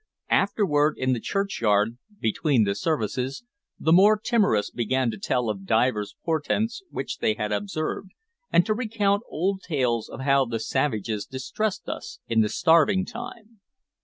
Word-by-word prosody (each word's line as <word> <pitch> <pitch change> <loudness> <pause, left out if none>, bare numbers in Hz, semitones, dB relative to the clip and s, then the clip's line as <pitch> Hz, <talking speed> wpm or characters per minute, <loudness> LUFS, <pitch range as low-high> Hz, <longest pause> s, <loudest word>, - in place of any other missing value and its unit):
Afterward, 155 -7 +2
in 130 0 +1
the 120 - -1
churchyard, 115 - 0 0.2
between 125 +2 +2
the 100 -1 +1
services, 130 - -2 0.4
the 160 - +3
more 205 +4 +6
timorous 210 - +1
began 125 +1 0
to 110 - -7
tell 125 +4 0
of 100 -3 -4
divers 110 -2 +1
portents 195 - 0
which 135 - -5
they 110 - +1
had 105 -1 -3
observed, 105 - -3 0.4
and 175 - +5
to 215 - +1
recount 210 -3 0
old 190 +4 -1
tales 125 - -1
of - - -8
how 140 0 +3
the 115 -2 -3
savages 110 -4 -1
distressed 185 +11 -3
us - - -6
in 115 -1 +3
the 105 - +1
Starving 180 - +3
Time. 230 -2 -9
135 Hz, 150 wpm, -25 LUFS, -, 0.4 s, more